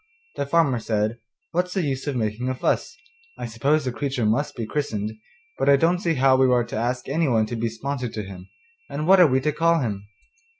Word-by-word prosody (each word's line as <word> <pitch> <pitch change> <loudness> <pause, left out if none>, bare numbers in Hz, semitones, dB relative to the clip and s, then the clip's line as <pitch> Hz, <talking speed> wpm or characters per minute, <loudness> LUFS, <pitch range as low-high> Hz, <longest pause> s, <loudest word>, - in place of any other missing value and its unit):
The 140 - -2
farmer 140 -5 +2
said, 110 +1 -1 0.3
'What's 180 +2 -1
the 190 - +1
use 135 -1 -3
of 145 - -1
making 115 +2 -2
a 130 - -1
fuss? - - -1 0.4
I - - -5
suppose 140 +6 +1
the 125 - -1
creature 130 -2 -2
must 120 +8 0
be 115 - -3
christened, 110 -5 -2 0.5
but - - +2
I 140 - +8
don't 165 +5 +2
see 170 -4 0
how 135 0 +4
we 130 -1 +4
are 120 -1 +3
to - - -7
ask 120 +3 -2
anyone 135 -7 +2
to 120 - -5
be 115 0 -1
sponsor 125 +2 -4
to 110 -1 -5
him, 95 -1 -10 0.4
and 150 +2 -3
what 190 +2 +6
are 175 - +8
we 130 -1 +2
to 150 +3 +1
call 165 +2 +2
him? 100 -5 -3
130 Hz, 220 wpm, -24 LUFS, 115-150 Hz, 0.5 s, I